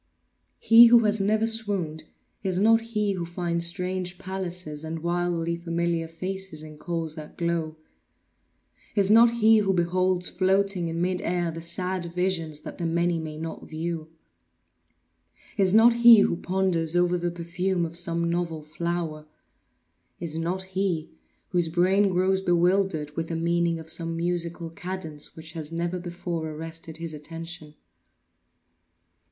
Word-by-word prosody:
He 230 +1 +8
who 235 0 +7
has 210 -1 +2
never 215 +3 +2
swooned, 200 -9 -2 0.4
is 185 -2 -1
not 225 +2 +5
he 215 -3 -1
who 180 -2 -3
finds 170 0 -1
strange 180 +1 -3
palaces 180 -5 -5
and 160 0 -5
wildly 170 -1 0
familiar 170 -1 -1
faces 185 -1 -5
in 155 -1 -11
coals 165 -3 -3
that 155 -1 -10
glow; 165 -2 -2 1.2
is 200 -1 +4
not 230 +2 +8
he 225 -1 +5
who 195 -2 +1
beholds 180 +1 +1
floating 190 -1 +1
in 165 +1 -2
mid 180 0 -1
air 175 -1 -1
the 165 +1 -7
sad 180 +1 -2
visions 170 -3 -2
that - - -9
the 170 - -1
many 170 0 +1
may 155 -1 -6
not 160 +1 -7
view; 160 0 -4 1.5
is 190 -2 +3
not 225 +3 +7
he 235 -2 +8
who 170 - +2
ponders 175 -3 0
over 175 0 +3
the 175 0 -1
perfume 175 +1 -2
of 165 0 -7
some 170 -1 +1
novel 170 -2 -2
flower; 155 0 -4 0.9
is 165 -2 -2
not 175 +3 -2
he 185 -4 -2 0.4
whose 175 -3 +1
brain 190 +4 +3
grows 190 +1 +1
bewildered 175 -4 +1
with 165 0 -2
the 165 - -3
meaning 170 0 +1
of 160 0 -10
some 165 0 -1
musical 170 -1 -2
cadence 165 -4 -6
which 160 0 -9
has 160 -2 -6
never 170 +2 -2
before 175 -2 -4
arrested 160 +1 -7
his 165 -1 -6
attention. 165 0 -8
175 Hz, 145 wpm, -26 LUFS, 165-190 Hz, 1.5 s, He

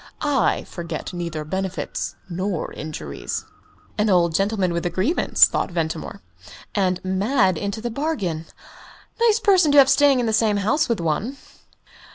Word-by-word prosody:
I 285 -5 +1
forget 170 -1 -6
neither 170 -3 -4
benefits 190 +3 -4
nor 185 0 -3
injuries." 70 - -6 0.5
"An 210 +1 +2
old 170 -3 +3
gentleman 195 -1 +1
with 170 - -2
a - - -1
grievance," 210 - +3
thought - - -2
Ventimore. 160 - -4 0.5
"And 185 -3 +1
mad 190 +1 +2
into 200 +6 -4
the 240 +1 -3
bargain. 205 - -2 0.7
Nice 460 -1 +4
person 375 -8 +4
to - - +5
have 270 -1 +8
staying 275 -1 +4
in 245 - 0
the 220 - 0
same 215 -2 +2
house 220 +10 +1
with 235 - 0
one!" 170 - -2
195 Hz, 150 wpm, -22 LUFS, 170-245 Hz, 0.7 s, have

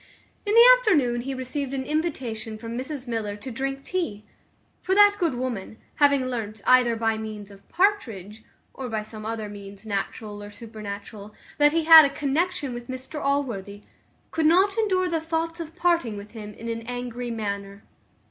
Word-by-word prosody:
In 415 - +2
the 470 +1 +9
afternoon 280 - +2
he 270 +2 -4
received 265 +1 -4
an 265 - -2
invitation 250 -8 -3
from 230 +1 -7
Mrs 265 +1 -5
Miller 220 -3 -3
to 230 +6 -8
drink 270 +3 -3
tea; 255 - -3 0.6
for 380 - 0
that 410 0 +6
good 335 -8 +1
woman, 240 -4 -4 0.2
having 280 -3 +4
learnt, 220 -4 -4
either 250 -2 +5
by 225 -1 0
means 210 -2 -7
of 195 0 -17
Partridge, 225 - 0 0.3
or 260 -2 -6
by 220 -1 -2
some 215 0 -8
other 220 -1 -3
means 200 0 -10
natural 205 0 -4
or 205 - -8
supernatural, 210 -1 -9 0.2
that 295 0 +6
he 330 +1 +1
had 320 0 +11
a 280 - +2
connexion 285 0 -1
with 240 0 -7
Mr 260 +3 -6
Allworthy, 225 -8 -2 0.5
could 320 -1 +2
not 375 +5 +4
endure 380 -5 +1
the 330 -2 -1
thoughts 330 +1 -2
of 325 -1 -7
parting 335 - +1
with 205 +1 -10
him 210 -2 -9
in 230 - -8
an 230 0 -3
angry 245 0 -4
manner. 200 -2 -4
245 Hz, 175 wpm, -25 LUFS, 215-305 Hz, 0.6 s, had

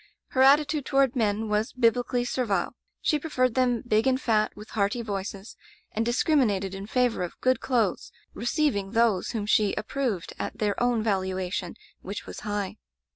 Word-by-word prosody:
Her 260 - +1
attitude 290 +2 +5
toward 275 -2 +3
men 220 -2 0
was 210 +1 0
Biblically 245 0 +1
servile. 230 -7 -1 0.3
She 300 - +2
preferred 255 -6 0
them 245 -2 +1
big 220 +2 +2
and 260 0 +2
fat, 215 -4 +1
with 210 +1 -11
hearty 215 +3 0
voices; 200 -1 -5 0.4
and 220 - -1
discriminated 235 - +1
in 195 +1 -6
favor 245 -3 +1
of 180 - -5
good 255 0 +2
clothes 235 -7 0
— - - -36
^receiving 230 -4 0
those 225 -5 +2
whom 220 -4 -3
she 210 -1 +2
ap 215 - -4
proved 240 -11 -2
at - - -4
their 210 -2 +1
own 240 -2 +2
valuation, 190 -3 -2 0.3
which 200 +2 -6
was - - -8
high. 205 -1 -3
225 Hz, 170 wpm, -27 LUFS, 205-255 Hz, 0.4 s, attitude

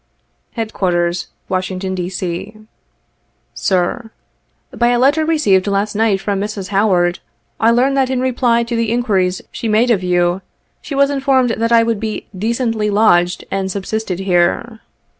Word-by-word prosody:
" - - -47
Headquarters, 180 -6 -1 0.2
"Washington, 185 0 -2
D. 180 -1 -3
C. 185 +3 -5 1.0
"Sir: 195 +6 -1 0.7
"By 240 - +2
a 245 0 +3
letter 280 +5 +3
received 210 - +2
last 200 +1 0
night 215 -2 +1
from 200 0 -2
Mrs. 205 -2 -4
Howard, 190 -3 +2 0.4
I 225 - +4
learn 250 +4 +3
that 270 -1 +1
in 260 -1 0
reply 245 -2 +1
to 235 0 -4
the 230 -1 0
inquiries 195 -7 0
she 230 - -4
made 225 +3 +3
of 205 -5 +2
you, 180 0 +1 0.4
she 285 - -6
was 280 +1 +3
informed 270 -3 +2
that 230 +1 -1
I 230 -1 +6
would 230 -2 -1
be 220 0 -4
"decently 225 +1 -1
lodged 180 -4 +2
and 195 -1 -1
subsisted 195 -1 -3
here." 190 +5 0
215 Hz, 155 wpm, -17 LUFS, 185-235 Hz, 1.0 s, I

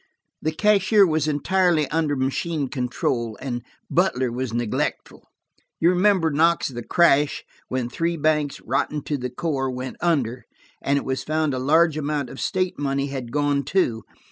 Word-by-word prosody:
The 155 - 0
cashier 210 +3 +4
was 155 -3 0
entirely 160 +1 +2
under 155 -2 +1
machine 140 +2 -1
control, 120 -3 -2
and 120 -3 -4 0.3
Butler 130 -9 +1
was 125 0 -3
neglectful. 120 -1 -3 0.5
You 170 +2 +4
remember, 180 -3 +3
Knox, 165 +3 +2
the 120 -2 -6
crash, 145 0 +3 0.2
when 130 -2 -2
three 165 +7 -2
banks, 150 -2 0
rotten 150 -2 -1
to 150 - -2
the 125 -2 -3
core, 135 0 -2
went 130 0 -5
under, 130 -8 0 0.4
and 140 +1 +1
it - - -3
was 130 -1 -2
found 155 -1 0
a 130 - -2
large 155 +3 +3
amount 145 -3 -2
of 135 - -8
state 185 -3 -1
money 140 0 -1
had 130 -4 -5
gone 145 0 +1
too. 125 -13 0
145 Hz, 160 wpm, -23 LUFS, 130-165 Hz, 0.5 s, cashier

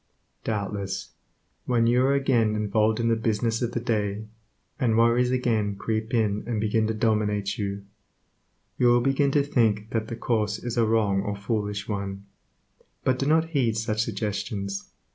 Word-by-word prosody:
Doubtless 100 -2 -3 0.5
when 120 -2 +2
you 120 +2 +3
are 140 - +3
again 120 -6 +2
involved 105 +1 +1
in 115 - +1
the 115 - +3
business 115 +1 0
of 120 -1 -1
the 120 - 0
day, 105 -3 -1 0.5
and 115 -5 +2
worries 120 +2 +4
again 115 -5 0
creep 110 +2 -3
in 105 -3 +1
and 115 -3 -1
begin 110 +1 +1
to 110 - -1
dominate 105 -3 0
you, 100 -1 -3 0.9
you 125 - +4
will 120 0 +5
begin 135 +2 +2
to 140 0 +2
think 110 -6 +1
that 110 -1 -1
the 115 - -5
course 105 -3 0
is 120 +1 -5
a 115 -2 +3
wrong 105 -3 +2
or 100 +1 -3
foolish 105 0 -3
one, 100 -1 -4 0.8
but 130 -1 +1
do 135 - 0
not 160 +2 +3
heed 125 -8 +1
such 110 -1 0
suggestions. 100 -2 -3
110 Hz, 165 wpm, -26 LUFS, 105-120 Hz, 0.9 s, will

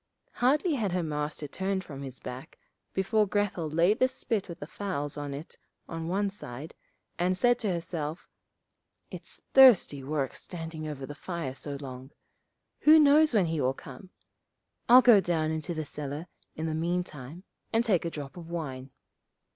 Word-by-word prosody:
Hardly 295 +7 +2
had 215 -9 -1
her 180 -1 0
Master 150 -1 -3
turned 190 +5 -2
his 135 -4 -8
back 130 +6 -8 0.3
before 210 +2 +1
Grethel 200 -5 -1
laid 170 +7 +3
the 255 - +5
spit 230 -6 -3
with 170 - -7
the - - -6
fowls 145 -8 -3
on 145 -1 -5
it 145 +4 -8 0.3
on 165 -1 -5
one 195 +3 0
side, 145 -6 -9 0.5
and 180 +1 +1
said 245 +3 +3
to 210 -4 0
herself, 165 -2 -4 0.8
'It's - - -6
thirsty 240 - +7
work 140 -1 -2
standing 165 -3 -6
over 140 -3 -5
the 145 - -7
fire 165 -3 -5
so 140 +1 -5
long. 130 -1 -8 0.7
Who 310 +1 +7
knows 300 -2 +6
when 200 -4 +4
he 160 -2 -1
will 130 +1 +1
come. 135 +9 -11 0.8
I'll 250 +2 +9
go 225 -5 +7
down 160 -3 0
into 160 +2 -3
the 155 -1 -3
cellar 145 +2 -5 0.3
in 160 - -3
the 160 - -1
meantime 165 -2 -3 0.3
and 230 +1 +2
take 195 -7 +2
a 170 - -1
drop 145 -4 -7
of 170 -1 -9
wine.' 135 -6 -5
165 Hz, 165 wpm, -29 LUFS, 145-200 Hz, 0.8 s, I'll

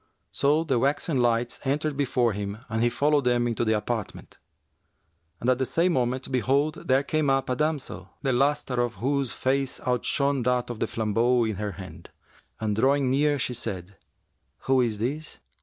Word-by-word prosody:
So 150 +3 +2
the 135 -7 +1
waxen 140 +1 +1
lights 120 0 +1
entered 150 +2 -1
before 125 -5 +1
him 100 0 -4
and 110 +1 -1
he 120 - +4
followed 145 +3 +2
them 120 -1 +2
into 115 0 -1
the 110 -1 +2
apartment. 110 -1 -5 1.1
At 130 0 +3
the - - +2
same 175 +2 +2
moment, 130 0 -1
behold, 140 +4 0
there 135 +2 +3
came 155 0 0
up 135 -1 +1
a - - +1
damsel, 145 - -2
the 135 - +1
lustre 135 -1 +1
of 120 -4 -2
whose 135 +5 0
face 135 0 -1
outshone 140 +2 0
that 125 0 0
of 115 - -7
the - - 0
flambeau 115 +3 +1
in 110 -3 -2
her 105 -1 -3
hand, 95 0 -10 0.5
and 105 -2 -1
drawing 135 +3 +2
near 145 +2 +2
she 125 -1 -2
said, 100 -5 -6 0.7
'Who 130 -1 +3
is 115 -4 0
this?' 140 +8 -3
125 Hz, 175 wpm, -26 LUFS, 115-140 Hz, 1.1 s, he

